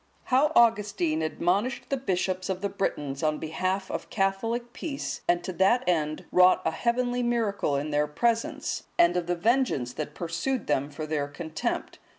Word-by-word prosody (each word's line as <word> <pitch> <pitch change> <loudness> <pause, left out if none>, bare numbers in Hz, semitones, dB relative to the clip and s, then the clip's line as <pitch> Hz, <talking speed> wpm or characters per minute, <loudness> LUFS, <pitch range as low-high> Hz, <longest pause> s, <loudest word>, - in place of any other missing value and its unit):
How 275 +4 +3
Augustine 210 -9 +3
admonished 180 - -1
the 275 - +2
bishops 185 -5 -1
of 190 -1 -2
the 200 - -1
Britons 145 -9 -2
on 155 -1 +1
behalf 185 +5 -2
of - - -4
Catholic 225 +5 -1
peace, 290 -4 -4
and 175 0 +2
to 185 - -4
that 195 +8 +3
end 155 -3 0
wrought 185 0 +5
a - - +2
heavenly 245 +1 0
miracle 225 -10 0
in 145 +2 -2
their 150 0 +2
presence; 230 +9 -1
and 345 -1 +5
of 175 -1 -1
the 175 - +1
vengeance 205 - +1
that 155 - -5
pursued 175 +10 -2
them 140 -1 0
for 155 +2 -6
their 150 -2 -1
contempt. 160 +2 -4
185 Hz, 165 wpm, -27 LUFS, 155-235 Hz, -, wrought